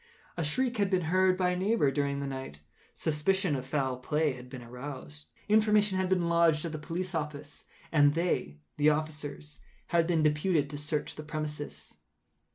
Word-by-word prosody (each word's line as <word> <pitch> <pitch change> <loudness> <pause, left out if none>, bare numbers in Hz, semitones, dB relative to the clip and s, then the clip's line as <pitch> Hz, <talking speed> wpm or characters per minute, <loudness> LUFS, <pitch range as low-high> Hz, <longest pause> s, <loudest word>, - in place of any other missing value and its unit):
A 170 - -1
shriek 245 - +1
had 200 -2 +2
been 185 -2 +1
heard 185 0 +4
by 180 -1 +2
a - - 0
neighbour 190 -5 +2
during 140 0 -1
the - - -3
night; 130 - -6 0.4
suspicion 160 +2 +1
of 130 -1 -5
foul 135 -3 0
play 150 +3 0
had 125 0 -11
been 125 -2 -8
aroused; 120 - -8 0.2
information 210 -2 +4
had 185 -1 0
been 180 -2 +2
lodged 170 -2 +3
at 165 - -3
the 155 - -5
police 175 +4 -4
office, 150 -2 -5 0.3
and 145 -2 +5
they 165 - 0 0.2
(the 150 +1 +5
officers) 150 -1 -3 0.3
had 170 -1 +3
been 165 -3 +2
deputed 150 0 +2
to 145 - -5
search 150 +1 -3
the 155 - -6
premises. 150 -1 -6
150 Hz, 175 wpm, -30 LUFS, 145-180 Hz, 0.4 s, and